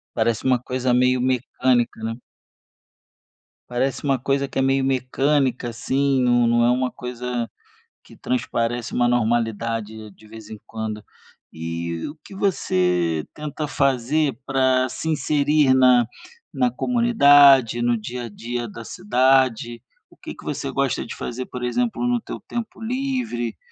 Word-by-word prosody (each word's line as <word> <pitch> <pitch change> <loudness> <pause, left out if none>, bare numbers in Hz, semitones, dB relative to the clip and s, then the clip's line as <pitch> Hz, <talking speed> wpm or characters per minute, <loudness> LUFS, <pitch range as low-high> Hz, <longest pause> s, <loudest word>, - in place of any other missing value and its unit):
Parece 115 +1 0
uma 130 -2 +3
coisa 125 +1 -1
meio 125 0 +3
mecânica, 125 -2 0
né. 115 0 -2 1.5
Parece 125 +2 -1
uma 135 -1 +2
coisa 140 +2 -1
que - - -8
é - - +3
meio 135 0 +2
mecânica, 130 -1 0
assim, 135 +3 0
nu 120 -1 +3
não 120 0 +3
é 120 - +4
uma 125 0 +1
coisa 125 -1 -5 0.5
que - - -16
transparece 120 - -2
uma 120 0 +2
normalidade 115 -2 0
de 110 -1 -10
de 110 +2 -19
vez 110 0 -12
em 110 - -8
quando. 110 -1 -5 0.5
E 85 +1 -4
o 145 - -8
que 195 - -12
você 90 - 0
tenta 150 0 -5
fazer 140 0 +1
para 130 -1 +2
se 160 +5 -5
inserir 150 -2 +2
na 125 -2 +5 0.5
na 250 - +2
comunidade, 145 - +5
no 120 0 +2
dia 120 +3 -6
a - - -7
dia 120 +3 -5
da 115 +2 -9
cidade? 130 - +1 0.3
O - - -19
que - - -9
que - - -14
você - - -3
gosta - - -1
de - - -8
fazer, 125 +1 -5
por 125 -1 -7
exemplo, 240 - -1
no 245 -1 +1
teu - - -7
tempo 235 -2 -6
livre, 240 - -2
125 Hz, 150 wpm, -22 LUFS, 115-140 Hz, 1.5 s, na